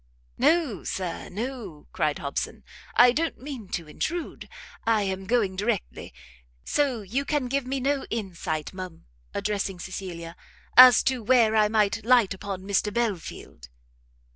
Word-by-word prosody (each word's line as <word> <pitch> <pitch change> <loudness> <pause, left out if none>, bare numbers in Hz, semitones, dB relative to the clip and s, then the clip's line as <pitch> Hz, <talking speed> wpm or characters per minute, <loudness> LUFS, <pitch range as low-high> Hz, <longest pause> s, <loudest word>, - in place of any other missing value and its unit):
"No, 310 - +2
Sir, 180 -3 -4
no," 215 - -6
cried 150 -1 0
Hobson, 140 -1 -4 0.3
"I 245 0 +7
don't 325 +6 -1
mean 255 -7 -8
to 165 -2 -4
intrude, 330 - -4 0.3
I 225 -2 +2
am 190 -1 -3
going 210 -4 +1
directly. 205 +1 -3 0.5
So 265 -7 0
you 240 +9 -2
can 290 -2 -1
give 270 0 -1
me 270 +1 -1
no 275 +1 0
insight, 180 -8 -4
ma'am," 185 -3 -8 0.3
addressing 200 -2 -2
Cecilia, 175 -3 -7 0.4
"as 250 -1 +10
to 260 -2 0
where 225 -1 +4
I 215 -1 +5
might 215 0 +1
light 235 -4 +4
upon 190 0 -6
Mr 200 +1 0
Belfield?" 200 - -4
210 Hz, 140 wpm, -26 LUFS, 190-250 Hz, 0.5 s, as